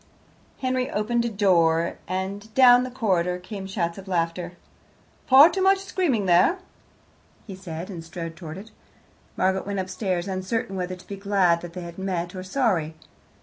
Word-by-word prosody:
Henry 255 -1 0
opened 235 +3 0
a - - 0
door, 170 -5 +2
and 195 +4 -4
down 245 -2 +7
the 255 - -3
corridor 185 -8 0
came 190 +1 -8
shouts 170 -2 -2
of 195 - -12
laughter. 170 0 -2 0.7
"Far 275 +4 +9
too 380 - -2
much 385 +1 +5
screaming 360 - -1
there," 180 - +4 0.9
he 200 - -8
said, 175 -2 -7
and 170 -3 -7
strode 165 0 -7
towards 160 -1 -8
it. 220 +1 -16 0.7
Margaret 190 +1 0
went 200 0 -3
upstairs, 185 -1 -2
uncertain 190 +2 -3
whether 185 0 -3
to 180 - -16
be 200 - -6
glad 195 -4 +2
that 175 -1 -9
they 180 - -6
had 170 +1 -9
met, 180 -2 -3
or 185 - -6
sorry. 185 - 0
190 Hz, 165 wpm, -24 LUFS, 175-220 Hz, 0.9 s, Far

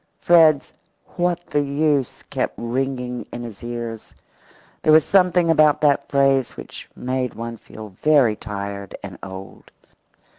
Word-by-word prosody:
Fred's 160 -4 +4 0.4
"What's 175 -1 0
the 145 - +2
use?" 140 -2 0
kept - - -3
ringing 125 0 -3
in 120 - -6
his 115 -3 -9
ears. 120 -2 -6 0.7
There 155 - +3
was 155 0 +6
something 180 -3 +3
about 155 -2 +4
that 145 -2 +2
phrase 135 -2 +2
which - - -9
made 125 -1 -3
one 115 +1 -5
feel 110 0 -11
very 125 +2 +3
tired 100 -2 -6
and 95 -3 -8
old. 95 0 -10
130 Hz, 135 wpm, -21 LUFS, 115-150 Hz, 0.7 s, was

